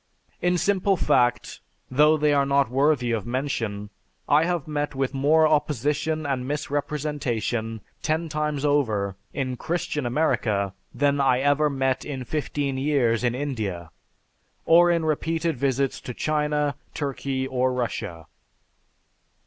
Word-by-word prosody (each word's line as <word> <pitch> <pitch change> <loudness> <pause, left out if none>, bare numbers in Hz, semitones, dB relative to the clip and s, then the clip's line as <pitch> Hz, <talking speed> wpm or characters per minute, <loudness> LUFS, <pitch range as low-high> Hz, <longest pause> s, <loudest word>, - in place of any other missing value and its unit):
In 180 0 +2
simple 195 +2 +2
fact, 120 -6 +1 0.3
though 150 +4 +5
they 150 -1 +2
are 140 -1 +3
not 140 -3 +2
worthy 135 -2 +2
of 115 -1 -2
mention, 115 -6 -3 0.4
I 150 +3 +4
have 175 -4 -1
met 145 -2 -2
with 135 0 -1
more 155 +4 +4
opposition 150 +1 0
and 130 -3 -2
misrepresentation, 140 -6 -2 0.2
ten 160 +2 -1
times 150 -2 -2
over, 110 -10 +1 0.2
in 130 -2 -3
'Christian' 150 -4 -2
America, 110 -8 0 0.2
than 145 0 +1
I 130 -2 +3
ever 145 +2 +3
met 135 -2 0
in 135 -3 -5
fifteen 140 -1 -2
years 130 -5 +1
in 120 -1 +1
India, 105 - -4 0.7
or 175 +1 +6
in 170 -2 +1
repeated 160 +1 0
visits 135 +1 0
to 125 - -7
China, 150 -2 0 0.2
Turkey, 135 -2 -2
or 130 -1 0
Russia." 100 -10 -3
140 Hz, 130 wpm, -25 LUFS, 125-150 Hz, 0.7 s, or